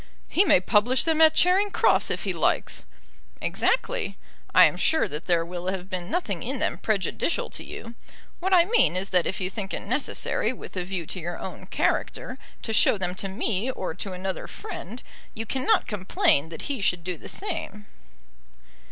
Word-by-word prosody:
"He 375 - +4
may 400 - +5
publish 220 +7 +3
them 320 -1 +1
at 315 0 +7
Charing 380 +3 +4
Cross - - +3
if - - -2
he 190 - -1
likes." 165 - 0 0.5
"Exactly. - - 0 0.3
I - - +8
am - - +2
sure - - +2
that 150 +2 -6
there 170 -2 +2
will 175 +1 -6
have 190 0 -3
been 180 -1 -3
nothing 205 - -1
in 265 +3 -3
them - - -1
prejudicial 215 - -1
to - - -4
you. 230 0 -8 0.5
What 380 +2 -1
I 350 -2 +6
mean 440 - +3
is 190 +1 -1
that 180 -2 +3
if - - -3
you 185 - 0
think 195 -1 -4
it - - -4
necessary, 245 -1 0
with 245 - -10
a 180 - -1
view 180 -2 -4
to 185 - -4
your 175 +1 -5
own - - -8
character, - - -1 0.2
to 225 - -3
show 215 - +4
them 180 -2 -2
to 190 +1 -4
me 210 +3 -1
or 190 -10 -3
to 190 +3 -6
another 185 +1 -4
friend, 230 +8 -8 0.3
you 225 0 -4
cannot 270 - +2
complain 185 -7 +1
that 165 - -7
he 275 -6 -3
should 180 -3 +1
do 180 0 -3
the - - -10
same." 330 - -4
195 Hz, 190 wpm, -26 LUFS, 180-260 Hz, 0.5 s, I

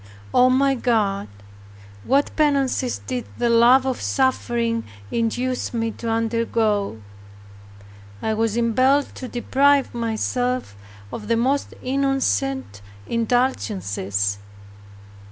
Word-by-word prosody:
O 250 +1 +5
my 270 +2 +3
God, 215 -6 0 0.8
what 280 +2 +1
penances 275 -4 +1
did 250 -2 -5
the 240 -1 +1
love 240 +3 +6
of 260 -2 -2
suffering 235 -3 0 0.3
induce 245 +2 -1
me 225 -1 -1
to 230 +1 -6
undergo! 225 - 0 1.2
I 220 - -1
was 225 0 0
impelled 255 +5 +2
to 255 - -7
deprive 275 +3 +2
myself 240 - -2 0.4
of 210 - -6
the 230 0 +2
most 270 +4 0
innocent 270 - -1 0.2
indulgences. 100 - -1
240 Hz, 100 wpm, -22 LUFS, 225-260 Hz, 1.2 s, love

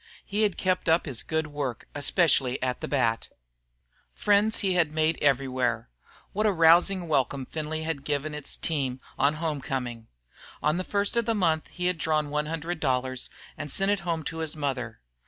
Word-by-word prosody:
He 210 +1 -1
had 210 -4 +2
kept 185 -2 0
up 165 +2 +3
his 135 -7 -3
good 160 -1 -1
work, 145 -5 -4
especially 145 -3 +2
at 125 -1 -1
the - - -3
bat. 115 -5 0 0.9
Friends 210 +2 +3
he 195 -3 +1
had 170 -4 +2
made 155 +1 +1
everywhere. 130 - +1 0.4
What 215 +2 +2
a - - +4
rousing 175 +2 +4
welcome 135 -2 0
Findlay 155 +2 -3
had 160 -4 -3
given 150 +1 -2
its 150 -1 -1
team 135 -5 -1 0.2
on 140 +2 +3
home 155 -3 -2
coming! 120 -4 -4 0.6
On 155 +3 +2
the 185 - -1
first 200 +3 0
of 235 -1 +2
the 230 - +2
month 165 -6 +1
he 180 - -5
had 180 -2 0
drawn 155 -2 0
one 150 0 0
hundred 165 +2 -3
dollars 130 -2 -1 0.3
and 145 - -6
had - - +2
sent 195 +1 +3
it 205 - +1
home 170 -3 -2
to 165 +3 -5
his 160 -1 -2
mother. 130 - -3
155 Hz, 190 wpm, -27 LUFS, 135-175 Hz, 0.9 s, a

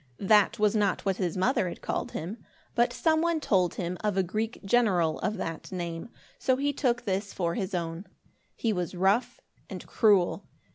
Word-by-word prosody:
That 210 +3 +4
was 210 0 +2
not 205 -3 +1
what 195 -1 +1
his 180 -2 -2
mother 205 0 +1
had - - -9
called - - -3
him, 190 +9 -6 0.3
but 240 0 +2
some 315 -1 +2
one 335 -1 +1
told 185 - +1
him 180 0 -3
of 210 -2 0
a 190 - +3
Greek 215 +6 -3
general 190 -8 +2
of 215 0 -2
that 165 -1 -5
name; 170 +2 -5 0.3
so 260 - +2
he 285 +1 0
took 250 -3 0
this 195 0 -2
for 170 -2 -1
his 190 -2 -3
own. 170 +2 -4 0.5
He 225 -2 0
was 180 -1 -3
rough 195 +7 +1 0.3
and - - -7
cruel. 200 -3 +2
195 Hz, 185 wpm, -28 LUFS, 180-230 Hz, 0.5 s, That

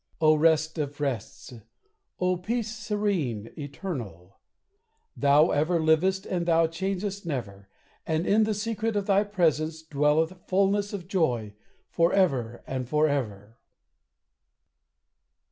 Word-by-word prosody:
O 155 -1 +5
rest 160 +1 +2
of 145 -1 -4
rests! 130 -4 -4 0.7
O 180 0 +2
peace 220 +4 -3
serene, 200 - -2
eternal! 135 - -7 0.8
Thou 145 +3 +4
ever 160 +4 +1
livest 165 +5 +2
and 175 -2 -2
thou 165 -1 +4
changest 190 +4 -3
never; 100 - -5 0.4
And 160 +2 0
in 215 +2 +4
the 215 -1 -1
secret 220 +1 -2
of 205 -1 0
thy 200 0 +3
presence 160 -5 0
dwelleth 155 +2 +1
Fullness 200 +2 +1
of 185 -4 -6
joy, 125 - 0 0.3
forever 165 -10 +1
and 130 -2 -4
forever. 125 -9 -1
160 Hz, 110 wpm, -27 LUFS, 140-195 Hz, 0.8 s, O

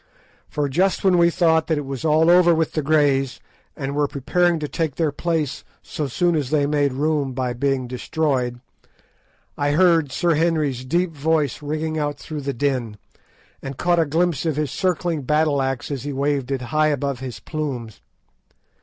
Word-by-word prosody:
For 145 -1 -1
just 180 +8 +1
when 185 -2 +4
we 170 0 +5
thought 160 -2 +2
that 160 - +1
it 145 - -3
was 135 -2 -5
all 160 +2 +4
over 175 -1 +6
with 160 -1 0
the 155 - -1
Greys, 140 -3 +2 0.4
and 140 -2 -4
were 145 0 +2
preparing 170 +6 +1
to 150 -1 -3
take 160 -2 -2
their 160 -3 0
place 155 -2 -2 0.2
so 150 - -4
soon 175 +6 +1
as 145 -5 -1
they 150 -1 +2
made 145 -2 +1
room 145 -1 0
by 125 -1 -2
being 130 0 -1
destroyed, 125 -1 -1 1.0
I 145 0 +1
heard 165 -4 +3
Sir 170 +6 +1
Henry's 150 -5 0
deep 170 +6 0
voice 150 -1 0
ringing 155 +2 -2
out 145 -1 -2
through 150 0 -6
the 140 0 -2
din, 125 -5 -1 0.6
and 135 -1 -7
caught 175 -1 +2
a 165 - +3
glimpse 165 0 0
of 160 -3 0
his 150 -1 -1
circling 175 -3 -1
battle 150 +1 +1
axe 135 +1 -2
as 140 -3 -3
he 145 0 -4
waved 140 -1 -1
it 135 -2 -2
high 155 0 +4
above 140 -3 -1
his 125 -4 -6
plumes. 135 -8 -5
150 Hz, 180 wpm, -22 LUFS, 135-160 Hz, 1.0 s, over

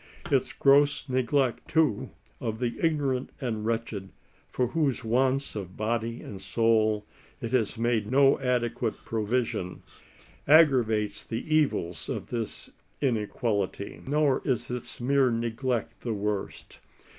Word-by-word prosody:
Its - - +2
gross 140 +1 +4
neglect, 130 0 +1
too, 155 -5 +1 0.3
of 115 -4 -3
the 120 -1 -2
ignorant 140 -6 +1
and 110 -5 -3
wretched, 115 -4 -2 0.4
for 125 - 0
whose 140 -4 0
wants 130 +4 +1
of 95 -3 -6
body 115 +1 -2
and 95 -2 -8
soul 110 0 +2 0.3
it 115 - -5
has 120 -3 +1
made 115 -2 0
no 135 +1 +5
adequate 120 -2 0
provision, 110 -4 -2 0.6
aggravates 115 -9 +4
the 120 +7 -2
evils 90 - 0
of - - -4
this 115 -3 -4 0.3
inequality. 105 -5 -1
Nor 145 -1 +2
is 120 -3 -1
its 125 +1 -5
mere 135 +1 +3
neglect 115 0 -2
the 115 -3 -2
worst. 105 -1 -4
120 Hz, 120 wpm, -28 LUFS, 110-135 Hz, 0.6 s, no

